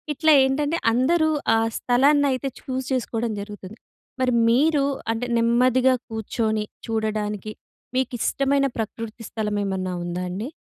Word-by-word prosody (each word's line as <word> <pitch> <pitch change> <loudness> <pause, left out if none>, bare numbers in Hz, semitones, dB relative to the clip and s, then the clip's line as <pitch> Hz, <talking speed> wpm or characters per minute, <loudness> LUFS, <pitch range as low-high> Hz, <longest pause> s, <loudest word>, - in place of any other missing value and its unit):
ఇట్లా 315 +2 +4
ఏంటంటే 290 +5 0
అందరూ 315 +7 +3 0.3
ఆ - - +3 0.2
స్థలాన్నయితే 275 +1 +2
చూస్ 260 0 -4
చేసుకోవడం 235 -3 -1
జరుగుతుంది. 205 0 -10 0.4
మరి 255 -1 +2 0.2
మీరు 285 +3 +3 0.3
అంటే 225 +2 -2
నెమ్మదిగా 250 +2 +3 0.2
కూర్చొని 220 -1 -2 0.2
చూడడానికి 215 -2 -2 0.4
మీకిష్టమైన 270 +2 +1
ప్రకృతి 225 +1 -5
స్థలం 210 -2 -2
ఏమన్నా 190 -2 -2
ఉందా 175 +1 -3
అండి? 195 +7 -4
235 Hz, 115 wpm, -23 LUFS, 215-265 Hz, 0.4 s, ఇట్లా